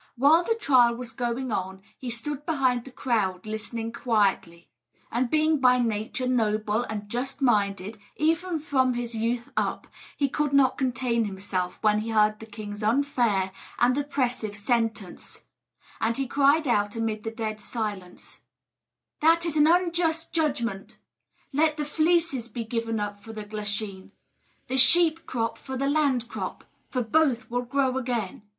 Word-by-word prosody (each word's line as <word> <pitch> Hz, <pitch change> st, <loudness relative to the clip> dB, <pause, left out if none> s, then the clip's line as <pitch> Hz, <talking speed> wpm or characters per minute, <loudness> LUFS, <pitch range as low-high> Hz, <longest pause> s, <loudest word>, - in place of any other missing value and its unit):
While 290 Hz, +7 st, +5 dB
the 455 Hz, -, +1 dB
trial 255 Hz, -, +4 dB
was 245 Hz, -1 st, -6 dB
going 245 Hz, 0 st, -3 dB
on 190 Hz, -1 st, -3 dB
he 255 Hz, -, -7 dB
stood 270 Hz, +5 st, -5 dB
behind 260 Hz, -7 st, +1 dB
the 265 Hz, -, -10 dB
crowd 215 Hz, -8 st, -1 dB
listening 225 Hz, +1 st, -4 dB
quietly; 195 Hz, -8 st, 0 dB, 0.4 s
and 240 Hz, +1 st, 0 dB
being 310 Hz, +1 st, +2 dB
by 250 Hz, -1 st, +5 dB
nature 230 Hz, +1 st, -1 dB
noble 215 Hz, -3 st, +1 dB
and 210 Hz, -1 st, -5 dB
just 250 Hz, +5 st, -3 dB
minded, 205 Hz, -4 st, +1 dB, 0.2 s
even 330 Hz, +3 st, +1 dB
from 260 Hz, -4 st, +1 dB
his 240 Hz, -1 st, -3 dB
youth 230 Hz, +2 st, -2 dB
up, -, -, -1 dB, 0.3 s
he 280 Hz, -, +2 dB
could 295 Hz, +1 st, -1 dB
not 275 Hz, -2 st, +4 dB
contain 245 Hz, -3 st, 0 dB
himself 190 Hz, -2 st, -3 dB
when 210 Hz, -1 st, +4 dB
he 220 Hz, +2 st, -4 dB
heard 215 Hz, -1 st, +3 dB
the 225 Hz, -, -10 dB
king's 210 Hz, -1 st, -8 dB
unfair 225 Hz, -5 st, +1 dB, 0.3 s
and 245 Hz, +1 st, +3 dB
oppressive 250 Hz, -7 st, -1 dB
sentence; 225 Hz, -2 st, -2 dB, 0.6 s
and 230 Hz, +1 st, 0 dB
he 270 Hz, -, 0 dB
cried 285 Hz, +3 st, +3 dB
out 205 Hz, -3 st, +1 dB
amid 225 Hz, -1 st, -2 dB
the 225 Hz, -, -2 dB
dead 220 Hz, -1 st, -4 dB
silence: 205 Hz, -7 st, -6 dB, 0.8 s
"That 330 Hz, +2 st, +4 dB
is 330 Hz, -3 st, -2 dB
an 300 Hz, 0 st, +5 dB
unjust 335 Hz, -1 st, +1 dB
judgment! 240 Hz, -, -1 dB, 0.6 s
Let 310 Hz, +2 st, +2 dB
the 300 Hz, -, -2 dB
fleeces 315 Hz, -4 st, +1 dB
be 240 Hz, -1 st, -5 dB
given 230 Hz, -1 st, -2 dB
up 205 Hz, -1 st, -4 dB
for 225 Hz, +2 st, -11 dB
the 215 Hz, -1 st, -6 dB
glasheen 205 Hz, -2 st, -5 dB, 0.5 s
the 260 Hz, +1 st, -2 dB
sheep 325 Hz, +5 st, +5 dB
crop 230 Hz, -2 st, -2 dB
for 265 Hz, -1 st, -6 dB
the 275 Hz, +2 st, 0 dB
land 280 Hz, -5 st, +1 dB
crop -, -, -6 dB, 0.3 s
for 250 Hz, -2 st, -1 dB
both 250 Hz, -1 st, +1 dB
will 245 Hz, 0 st, 0 dB
grow 265 Hz, +1 st, 0 dB
again!" 235 Hz, -7 st, -3 dB
240 Hz, 155 wpm, -26 LUFS, 215-275 Hz, 0.8 s, While